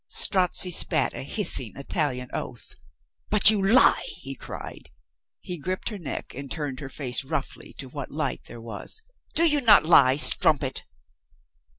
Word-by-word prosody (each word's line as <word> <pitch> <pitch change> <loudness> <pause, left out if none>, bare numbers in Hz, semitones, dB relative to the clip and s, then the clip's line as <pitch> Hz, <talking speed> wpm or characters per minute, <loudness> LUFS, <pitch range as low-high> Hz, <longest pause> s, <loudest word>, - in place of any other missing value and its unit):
Strozzi 185 -1 +1
spat 160 -3 +1
a - - -7
hissing 135 - +3
Italian 140 -3 -3
oath. - - -6 0.6
"But 210 0 +5
you 205 -3 0
lie!" 225 +7 +5 0.2
he - - -7
cried. - - -10 0.5
He 180 -4 -7
gripped 185 +8 -4
her 210 -3 -8
neck 165 - -7
and 140 +1 -9
turned 145 -4 -5
her 135 - -8
face 130 -1 -3
roughly 135 - -6
to - - -9
what - - -8
light - - -4
there 120 - -12
was. 115 - -6 0.3
"Do 335 +1 +5
you 295 -2 +4
not 215 -9 +5
lie, 140 -6 +5
strumpet?" 145 -2 +2
155 Hz, 155 wpm, -24 LUFS, 135-195 Hz, 0.6 s, But